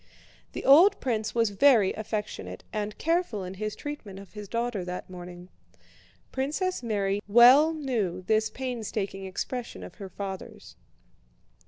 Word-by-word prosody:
The - - -5
old 355 +9 +7
prince 220 -4 -2
was 230 -3 +2
very 220 -2 +5
affectionate 215 -1 -5
and 210 -1 -3
careful 330 - 0
in 185 0 -6
his 215 +2 -4
treatment 290 -10 -7
of 195 0 -12
his 210 -1 -8
daughter 235 -4 -2
that 180 +1 -6
morning. 180 0 -10 0.8
Princess 305 +7 -1
Mary 205 -3 -1
well 250 +8 +7
knew 230 - -2
this 215 +2 +2
painstaking 215 -6 -4
expression 240 +6 -5
of - - -9
her 195 - -6
father's. 190 0 -7
215 Hz, 135 wpm, -27 LUFS, 195-255 Hz, 0.8 s, old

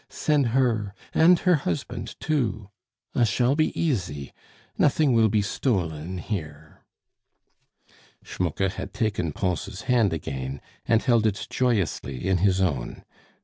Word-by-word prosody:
send 145 -4 +1
her 115 -5 +1 0.2
and 170 +2 +5
her 180 -3 +4
husband 85 - -4
too. 115 -9 -1 0.4
I - - +2
shall 120 +5 +2
be 155 +1 +2
easy. 90 - -2 0.4
Nothing 145 -1 +3
will 115 -1 +4
be 105 0 +2
stolen 90 - -2
here." 80 -6 -6 1.4
Schmucke 90 +2 -1
had - - -7
taken 105 -9 -1
Pons' 95 +4 -3
hand 120 -7 +3
again, 70 -4 -4 0.3
and 115 -1 +3
held 115 -4 +3
it 105 -1 -2
joyously 95 - -1
in 95 -1 +3
his 95 0 +3
own. 70 -10 -2
105 Hz, 125 wpm, -25 LUFS, 85-125 Hz, 1.4 s, and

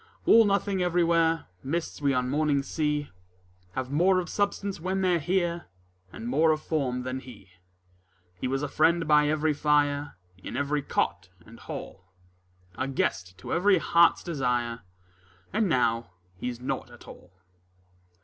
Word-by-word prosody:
All 225 0 +7
nothing 200 -1 +1
everywhere: 165 -2 +2 0.2
Mists 160 +3 -3
we 140 -1 +2
on 125 -1 0
mornings 145 0 +1
see 150 -2 -1 0.6
Have 130 +3 -4
more 180 +5 +3
of 180 - -4
substance 200 -1 -1
when 190 +3 -2
they're 180 -2 +2
here 175 +1 -1 0.4
And 115 - -7
more 155 +6 +3
of 155 -1 +2
form 135 -6 -2
than 130 +1 -3
he. 115 -7 -14 0.8
He 90 +8 -4
was 135 +2 -1
a - - 0
friend 165 +3 +2
by 150 -1 +5
every 155 0 +1
fire, 145 -3 +1 0.2
In - - -6
every 145 +1 0
cot 95 - -2 0.2
and 115 +2 -14
hall 95 -2 -8 0.7
A 130 - 0
guest 90 -8 -2
to 95 - -6
every 195 +3 +4
heart's 170 0 +4
desire, 125 -7 -1 0.7
And 215 -1 +1
now 120 - +1 0.3
he's 120 +5 -5
nought 125 - -4
at - - -15
all. 90 - -13
150 Hz, 150 wpm, -27 LUFS, 130-170 Hz, 0.8 s, All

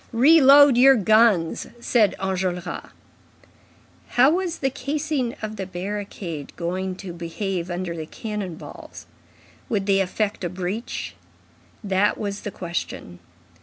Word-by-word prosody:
"Reload 280 0 +7
your 270 +1 +8
guns," 215 -5 +3
said 230 -4 +2
Enjolras. 185 -2 -3 1.2
How 260 +4 +4
was 350 -1 -1
the 270 -1 -1
casing 280 -1 -2
of 215 0 -5
the 190 -1 -4
barricade 185 -5 -6
going 185 +2 -3
to 185 -2 -8
behave 175 +1 -4
under 175 -1 -3
the 160 -1 -6
cannon 210 -5 -5
balls? - - -11 0.6
Would 205 -4 0
they 195 -1 +3
effect 200 +2 -1
a 175 - -1
breach? 185 +6 -4 0.7
That 195 0 +1
was 200 -1 -4
the - - -4
question. 170 - -6
200 Hz, 125 wpm, -23 LUFS, 180-235 Hz, 1.2 s, your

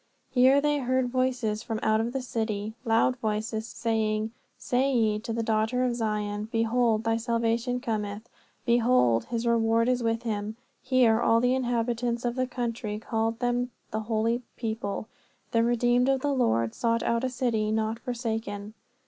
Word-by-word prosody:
Here 260 +2 +5
they 295 0 +1
heard 255 -1 +1
voices 250 -4 0
from 225 -2 -3
out 220 0 +3
of 230 +1 -2
the 265 0 -3
city, 220 -3 -3
loud 230 +3 +3
voices, 220 0 -2
saying, 220 -2 -1 0.3
Say 260 +2 +1
ye 220 -4 +2
to 230 - -6
the 230 0 -1
daughter 220 +3 +1
of 245 -1 +1
Zion, 210 -2 -2
Behold, 225 -1 +2
thy 225 0 +1
salvation 230 +1 0
cometh; 215 -2 -3 0.4
behold, 235 - +3
his 235 -1 -3
reward 230 0 +3
is 250 -1 +1
with 230 0 0
him. 215 -1 -3 0.2
Here 245 -3 +3
all 230 -1 +4
the 250 +1 +2
inhabitants 240 -1 -1
of 240 - 0
the 255 -1 0
country 235 -4 -3
called 225 +1 -1
them 245 0 0 0.2
the 220 - -1
holy 225 +2 0 0.2
people, 220 -2 -3 0.4
the 230 - +3
redeemed 240 +2 +2
of 270 -1 +2
the 285 0 0
Lord, 115 - +1
sought 230 -1 0
out, 235 +1 0
a 260 - +1
city 235 -4 0
not 220 +1 -1
forsaken. 225 -4 -4
230 Hz, 165 wpm, -27 LUFS, 220-245 Hz, 0.4 s, Here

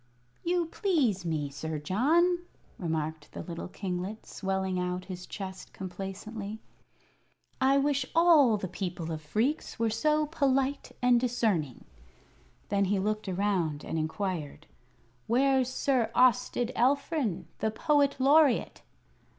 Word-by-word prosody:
"You 350 0 +1
please 290 - 0
me, 150 -4 -2
Sir 155 +3 -4
John," 305 - +2 0.4
remarked 160 -3 -3
the - - -6
little 170 -2 -6
kinglet, 185 +3 -5
swelling 190 -1 -2
out 180 0 -2
his 180 -1 -7
chest 190 -2 -7
complacently. 200 +3 -6 1.0
"I 270 +1 +4
wish 280 -1 +1
all 315 -9 +6
the 195 - -4
people 175 -3 -4
of 155 -1 -4
Phreex 220 - -1
were 230 -1 +1
so 305 +7 +2
polite 275 -2 0
and 250 -1 +5
discerning." 220 - -1 0.8
Then 200 -1 +2
he 200 +1 +1
looked 215 +1 -1
around 180 -6 0
and 160 - -2
inquired: 160 -2 -3 0.6
"Where's 260 +1 +3
Sir 255 -4 +1
Austed 250 -1 +3
Alfrin, 265 - +1
the 220 - +1
Poet 285 +4 +2
Laureate?" 280 0 +4
215 Hz, 120 wpm, -29 LUFS, 180-270 Hz, 1.0 s, all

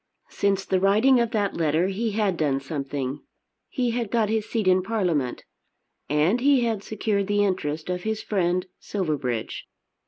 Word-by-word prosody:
Since 195 -1 0
the 190 - +1
writing 215 +7 +4
of 235 -1 +1
that 205 -3 0
letter 165 +3 +1
he 215 +3 -2
had 205 -3 +1
done 145 -4 +1
something. 140 -1 -4 0.5
He 250 -4 0
had 235 -2 -2
got 225 -2 +1
his 220 -1 -1
seat 220 -5 -1
in 185 0 +5
Parliament. 180 - -1 0.7
And 155 - +2
he 275 -1 +4
had 225 -4 -1
secured 205 -2 -1
the 205 0 +2
interest 155 -5 -2
of 180 0 -2
his 220 +2 -2
friend 180 -2 0
Silverbridge. 145 - -3
195 Hz, 160 wpm, -25 LUFS, 155-220 Hz, 0.7 s, in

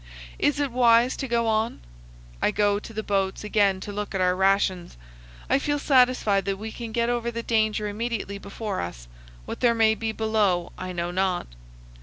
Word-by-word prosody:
Is 290 0 +2
it 285 -3 0
wise 240 0 +4
to 270 - -3
go 235 -1 +1
on? 220 +1 0 0.6
I - - +3
go 205 -1 +1
to 220 - -11
the 220 0 -4
boats 195 -1 -1
again 205 -3 +2
to 205 - -6
look 205 0 -5
at - - 0
our 180 0 +2
rations. 190 - +1 0.5
I - - +3
feel 290 +1 0
satisfied 250 -8 +3
that 195 -1 -1
we 220 +2 -6
can 230 -1 -7
get 235 +1 0
over 235 -1 -1
the 235 0 -5
danger 215 -2 +1
immediately 210 -2 -3
before 200 0 -4
us; - - -7 0.4
what - - -6
there 235 -1 +3
may 220 -1 +4
be 220 0 -3
below 215 -6 0
I 185 - -6
know 175 0 -3
not. 185 0 0
215 Hz, 190 wpm, -25 LUFS, 195-235 Hz, 0.6 s, wise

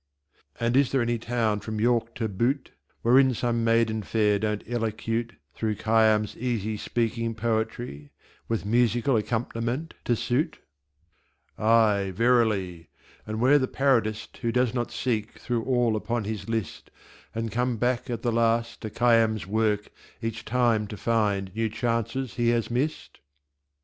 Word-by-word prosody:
And 115 +1 +1
is 140 -1 +4
there 135 -3 +2
any 120 0 -1
town 115 -2 0
from 110 0 -5
York 115 0 +1
to 115 - -1
Butte 120 +7 -1 0.3
Wherein 130 +2 +5
some 115 0 0
Maiden 115 -1 +2
fair 105 -1 +1
don't 105 0 -2
Elocute 115 0 -2 0.2
Through 110 -1 -2
Khayyam's 110 -1 +2
easy 110 -3 -2
speaking 115 +1 -2
poetry, 110 -9 -2 0.4
With 115 -3 -2
Musical 120 +4 +2
Accomp'niment 115 +6 -1
to 120 - +2
suit? 125 +8 -1 1.0
Aye, 105 -3 +3
verily! 105 -7 +1 0.4
And 110 0 -3
where 135 +5 +5
the 130 - 0
Parodist 115 -7 0
Who 115 -2 -1
does 125 0 +1
not 120 -2 -1
seek 110 -4 -2
through 120 -2 -2
all 120 -4 +2
upon 115 +1 -2
his 105 0 -5
List 115 -3 -3 0.5
And 115 -1 -2
come 125 +2 0
back 125 +2 0
at 115 -2 -4
the 120 - +1
last 115 0 +1
to 110 - -4
Khayyam's 115 -1 +2
work 105 0 0 0.3
Each 115 -1 -4
time 115 -2 +1
to 105 - -7
find 100 -4 0
New 110 +1 0
Chances 115 +2 -2
he 120 -1 +2
has 120 -1 0
missed? 135 +6 -2
115 Hz, 145 wpm, -26 LUFS, 110-120 Hz, 1.0 s, Wherein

